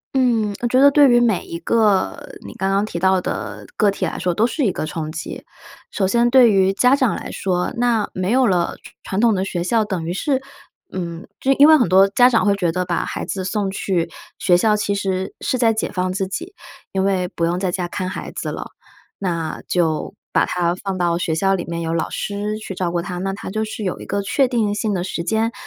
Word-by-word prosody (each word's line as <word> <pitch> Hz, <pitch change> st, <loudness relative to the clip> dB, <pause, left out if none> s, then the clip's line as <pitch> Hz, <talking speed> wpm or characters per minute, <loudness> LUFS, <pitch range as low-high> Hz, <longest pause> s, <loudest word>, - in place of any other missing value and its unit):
嗯， 230 Hz, -5 st, +2 dB
我 240 Hz, -, +1 dB
觉 255 Hz, +2 st, +3 dB
得 280 Hz, +1 st, +7 dB
对 285 Hz, -2 st, +6 dB
于 240 Hz, -, +5 dB
每 230 Hz, -6 st, +2 dB
一 170 Hz, -, -5 dB
个 210 Hz, 0 st, +2 dB, 0.3 s
你 -, -, -8 dB
刚 190 Hz, -, -2 dB
刚 195 Hz, +2 st, +1 dB
提 170 Hz, -5 st, -5 dB
到 190 Hz, +1 st, +3 dB
的 105 Hz, -, -5 dB
个 210 Hz, -, +3 dB
体 200 Hz, -, -2 dB
来 -, -, -4 dB
说 180 Hz, -, 0 dB
都 210 Hz, +6 st, +2 dB
是 280 Hz, +5 st, -1 dB
一 210 Hz, -, +2 dB
个 155 Hz, -, -3 dB
冲 155 Hz, 0 st, -4 dB
击。 160 Hz, -, -6 dB, 0.5 s
首 190 Hz, -, 0 dB
先 235 Hz, +4 st, +3 dB
对 245 Hz, -3 st, +6 dB
于 190 Hz, -1 st, +3 dB
家 250 Hz, +7 st, +4 dB
长 260 Hz, -5 st, +1 dB
来 -, -, -6 dB
说， 180 Hz, +2 st, -1 dB
那 235 Hz, -3 st, +1 dB
没 185 Hz, +1 st, -2 dB
有 255 Hz, +2 st, +4 dB
了 180 Hz, -5 st, +1 dB
传 -, -, -13 dB
传 190 Hz, -, -3 dB
统 230 Hz, -2 st, +4 dB
的 190 Hz, -1 st, 0 dB
学 175 Hz, -3 st, -3 dB
校， 220 Hz, +4 st, +2 dB
等 190 Hz, -6 st, -3 dB
于 170 Hz, -, -2 dB
是， 265 Hz, +7 st, 0 dB, 0.5 s
嗯， 170 Hz, -2 st, -5 dB
就 270 Hz, -, +1 dB
因 285 Hz, +2 st, +6 dB
为 315 Hz, -, +8 dB
很 245 Hz, -, +2 dB
多 190 Hz, +2 st, +6 dB
家 245 Hz, +5 st, +5 dB
长 230 Hz, -, +2 dB
会 200 Hz, -, +4 dB
觉 175 Hz, -4 st, 0 dB
得 180 Hz, +2 st, -2 dB
把 175 Hz, -1 st, -1 dB
孩 -, -, -4 dB
子 190 Hz, -2 st, -3 dB
送 195 Hz, 0 st, -1 dB
去 185 Hz, -3 st, -1 dB, 0.3 s
学 180 Hz, -2 st, +3 dB
校， 210 Hz, +4 st, +3 dB
其 205 Hz, -1 st, -1 dB
实 190 Hz, -1 st, -2 dB
是 255 Hz, -, 0 dB
在 230 Hz, -2 st, +3 dB
解 220 Hz, -, -2 dB
放 185 Hz, -1 st, -1 dB
自 190 Hz, 0 st, -2 dB
己， 345 Hz, -, -6 dB, 0.4 s
因 190 Hz, 0 st, 0 dB
为 190 Hz, -2 st, +1 dB
不 170 Hz, -, -4 dB
用 175 Hz, +2 st, 0 dB
在 185 Hz, -2 st, -1 dB
家 180 Hz, -1 st, -2 dB
看 185 Hz, +1 st, -4 dB
孩 185 Hz, -, -6 dB
子 -, -, -4 dB
了。 -, -, -6 dB, 0.5 s
那 170 Hz, -5 st, -3 dB
就 165 Hz, -3 st, 0 dB, 0.2 s
把 -, -, +4 dB
他 175 Hz, -1 st, 0 dB
放 190 Hz, 0 st, -4 dB
到 170 Hz, -1 st, +1 dB
学 165 Hz, -2 st, -1 dB
校 195 Hz, +4 st, +2 dB
里 175 Hz, -, -3 dB
面 170 Hz, 0 st, -5 dB
有 165 Hz, 0 st, -2 dB
老 165 Hz, -, -1 dB
师 205 Hz, +1 st, -3 dB
去 215 Hz, -3 st, -7 dB
照 175 Hz, -2 st, -1 dB
顾 175 Hz, -, -1 dB
他， 180 Hz, 0 st, -5 dB
那 195 Hz, +1 st, -2 dB
他 195 Hz, -, -7 dB
就 215 Hz, +3 st, -2 dB
是 215 Hz, 0 st, -5 dB
有 185 Hz, -, -2 dB
一 -, -, -8 dB
个 200 Hz, +1 st, -2 dB
确 255 Hz, +6 st, +1 dB
定 220 Hz, -5 st, 0 dB
性 210 Hz, 0 st, -1 dB
的 180 Hz, -, -1 dB
时 175 Hz, -2 st, -3 dB
间， 225 Hz, +4 st, 0 dB
195 Hz, 260 characters per minute, -20 LUFS, 180-220 Hz, 0.5 s, 为